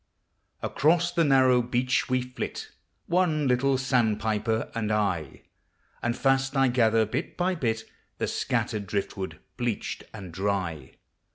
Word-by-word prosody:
Across 170 +3 +2
the 170 -1 +2
narrow 130 -4 +5
beach 125 +2 0
we 130 0 +1
flit, 125 0 -6 0.3
One 165 -5 +2
little 130 +2 +2
sandpiper 110 -4 0
and 110 -2 -1
I; 95 -9 -1 0.6
And 120 +1 -1
fast 135 0 +2
I 135 -1 +4
gather, 115 -2 +3
bit 110 - -4
by 180 +1 +1
bit, 115 -9 -1 0.3
The - - 0
scattered 105 -2 -1
driftwood 95 0 -3 0.2
bleached 120 -3 -3
and 95 -5 -9
dry. 90 -7 -2
120 Hz, 125 wpm, -27 LUFS, 105-135 Hz, 0.6 s, narrow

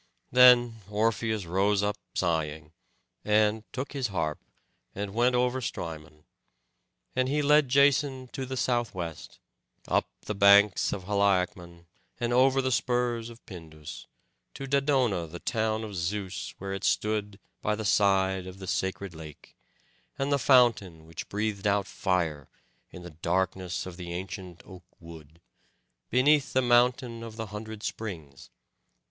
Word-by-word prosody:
Then 125 -2 +6
Orpheus 110 -1 0
rose 100 +4 +1
up 105 0 0 0.2
sighing, 80 -3 -1 0.5
and 105 +1 +1
took 130 +2 -5
his 135 -4 -1
harp, 85 -7 -2 0.6
and 100 0 -4
went 120 +2 +2
over 125 +1 +1
Strymon. 75 -7 -6 0.9
And 130 0 +1
he 150 +1 +1
led 150 -1 +4
Jason 140 -1 +3
to 130 0 -5
the 130 0 -4
southwest, 100 -11 -3 0.5
up - - +1
the 105 - -4
banks 100 0 +5
of 95 - -4
Haliacmon 90 -3 0 0.3
and 120 0 -1
over 135 +1 +4
the 130 - 0
spurs 120 -1 0
of 115 0 -15
Pindus, 80 -5 -10 0.5
to 135 - -6
Dodona 135 - +1
the 85 +3 -8
town 110 +3 -1
of 105 -2 -7
Zeus, 95 +2 -4
where 95 0 -5
it 95 - -5
stood 105 -2 0 0.2
by 105 - 0
the 110 0 -5
side 95 -2 +2
of 95 0 -9
the 95 - -8
sacred 95 +1 -3
lake, 80 -2 -12 0.6
and 135 +1 -1
the 140 - +2
fountain 115 - +3
which 80 0 -8
breathed 105 -1 -2
out 100 -1 +2
fire, 85 -9 -2 0.4
in 90 - -11
the 90 - -9
darkness 90 +3 -2
of 90 -2 -8
the 85 -2 -6
ancient 90 -1 -7
oak 95 -2 -13
wood, 80 -2 -13 0.7
beneath 140 +3 +3
the 130 - +3
mountain 120 -1 +2
of 115 -1 -8
the 110 0 -4
hundred 110 0 -7
springs. 80 -11 -6
105 Hz, 140 wpm, -28 LUFS, 90-120 Hz, 0.9 s, Then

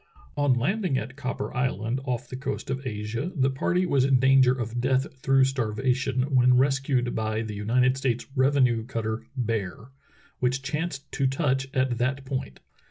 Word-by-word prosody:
On 145 -3 +3
landing 180 - 0
at 125 +3 -5
Copper 125 -3 -4
Island, 125 -1 -1
off 125 -2 -3
the 130 - -7
coast 135 0 -4
of 135 0 -3
Asia, 110 - -3
the 135 -2 +2
party 180 +7 0
was 140 -7 +2
in 135 -1 +4
danger 135 -1 +5
of 120 -2 -3
death 130 +1 +2
through 135 0 +3
starvation 130 +1 0
when 125 -1 +5
rescued 135 -2 +1
by 110 0 -1
the 110 -1 -6
United 125 +5 +2
States 130 -3 -1
revenue 130 -4 +3
cutter 110 -2 -4
Bear^ 110 -1 -3 0.5
which 130 +2 0
chanced 145 0 -4
to 135 - +1
touch 135 -1 0
at 130 -3 0
that 135 +2 -1
point. 130 - -5
130 Hz, 165 wpm, -26 LUFS, 120-135 Hz, 0.5 s, danger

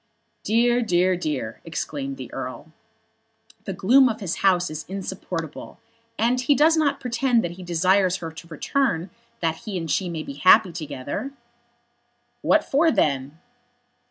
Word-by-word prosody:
"Dear, 240 +3 +2
dear, 185 -4 +2
dear," 300 - -4
exclaimed 275 -1 -4
the - - -9
Earl. - - -6 0.9
"The - - -3
gloom 255 +6 +5
of 220 -1 -4
his 190 -6 -3
house 180 -3 +2
is 155 +1 -5
insupportable. 185 -4 -6 0.4
And 245 +3 +2
he 280 +3 +3
does 315 +3 +5
not 285 -3 +1
pretend 245 -1 +1
that 175 - -3
he 180 +2 -10
desires 180 +2 +2
her 165 -3 -6
to 160 +1 -12
return 175 - -1 0.3
that 165 -1 0
he 200 +1 -5
and 165 -2 -4
she 185 -2 0
may 160 -2 -4
be 140 - -7
happy 185 +6 +5
together." 155 - -5 1.1
"What 310 - +3
for 315 +4 +3
then?" 140 - 0
190 Hz, 150 wpm, -24 LUFS, 165-250 Hz, 1.1 s, gloom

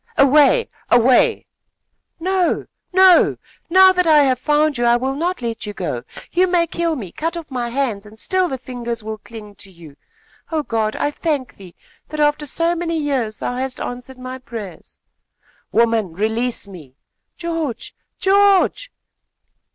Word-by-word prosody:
"Away! 295 - +5 0.2
away!" 255 - +4 0.7
"No, 370 0 0 0.3
no! 375 -1 +5 0.3
Now 375 +2 +7
that 360 -2 +1
I 305 -2 +6
have 260 -3 +1
found 295 -1 +1
you, - - 0
I 235 0 +4
will 260 +2 -1
not 340 +1 -2
let 230 -2 -4
you 205 - -5
go. 150 -11 -4 0.3
You 365 +2 +3
may 350 -1 +2
kill 335 0 -1
me, 200 - -7
cut 330 +2 -3
off 325 -4 -9
my 245 -2 -2
hands, 235 -6 -2
and 215 +1 -15
still 370 - +1
the 265 - -3
fingers 240 -3 -5
will 215 0 -6
cling 215 -2 -11
to 195 - -11
you. 165 -5 -15 0.5
Oh, 315 -2 0
God! 220 -4 -1
I 290 - -1
thank 295 -4 -2
thee, 185 -3 -13 0.3
that, 305 - -7
after 295 0 +1
so 335 +4 0
many 335 -1 -2
years, 265 -8 -1
thou 245 - -3
hast 260 0 -4
answered 250 +1 -7
my 255 +1 -7
prayers!" 215 -9 -9 0.7
"Woman, 225 -6 +2
release 220 +4 -2
me!" 155 -10 -13 0.4
"George! 330 -8 -4 0.2
George!" 400 +5 +3
260 Hz, 160 wpm, -19 LUFS, 225-330 Hz, 0.7 s, Now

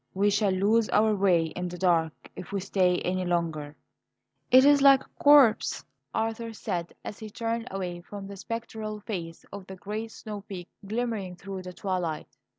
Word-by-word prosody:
We 205 +2 +3
shall 205 0 +2
lose 210 +4 +2
our 215 0 +3
way 190 -4 +3
in 180 +3 -4
the 180 0 -7
dark 170 -3 +2 0.2
if 170 - -8
we 200 - -1
stay 185 -1 +2
any 185 +1 -1
longer." 165 -4 -2 0.7
"It 260 +2 +7
is 290 -1 +6
like 275 -1 +7
a - - -28
corpse," 285 -6 +5 0.3
Arthur 225 +1 -2
said 175 -5 -3
as 205 - -6
he 220 - -7
turned 230 +2 -3
away 180 -2 -4
from 200 +2 -8
the 200 0 -8
spectral 215 0 -5
face 170 -6 -6
of 200 -2 -8
the 190 - -8
great 210 +4 -5
snow 210 -2 -7
peak 190 -3 -8 0.2
glimmering 215 -4 -2
through 195 +1 -7
the 180 0 -8
twilight. 175 -8 -3
200 Hz, 175 wpm, -27 LUFS, 180-220 Hz, 0.7 s, It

